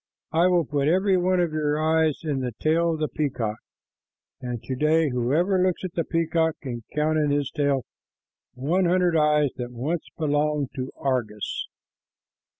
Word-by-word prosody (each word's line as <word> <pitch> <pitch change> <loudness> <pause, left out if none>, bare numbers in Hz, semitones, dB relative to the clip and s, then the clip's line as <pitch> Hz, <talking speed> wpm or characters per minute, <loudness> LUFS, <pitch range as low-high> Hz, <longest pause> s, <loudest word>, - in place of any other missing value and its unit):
I 165 +3 +4
will 175 -3 +3
put 145 0 0
every 190 +4 +3
one 185 0 +2
of 175 -2 +1
your 150 -1 0
eyes 160 -1 +2
in 145 -4 -1
the 125 -4 -4
tail 165 +2 +2
of 160 - -4
the 155 - +1
peacock." 120 -9 -2 0.8
And 125 -2 -4
to 130 - -3
day, 155 +3 +3
whoever 150 +10 +1
looks 185 0 0
at 185 -2 -4
the 165 - 0
peacock 165 -1 0
can 120 -4 -5
count 155 +1 +2
in 150 -1 +1
his 145 -1 0
tail 140 -3 0 0.7
the 125 - -10
hundred 180 0 +2
eyes 150 -2 +3
that 125 -1 -5
once 145 +8 -3
belonged 150 -2 0
to 130 0 -4
Argus. 120 -6 -2
150 Hz, 165 wpm, -25 LUFS, 135-165 Hz, 0.8 s, I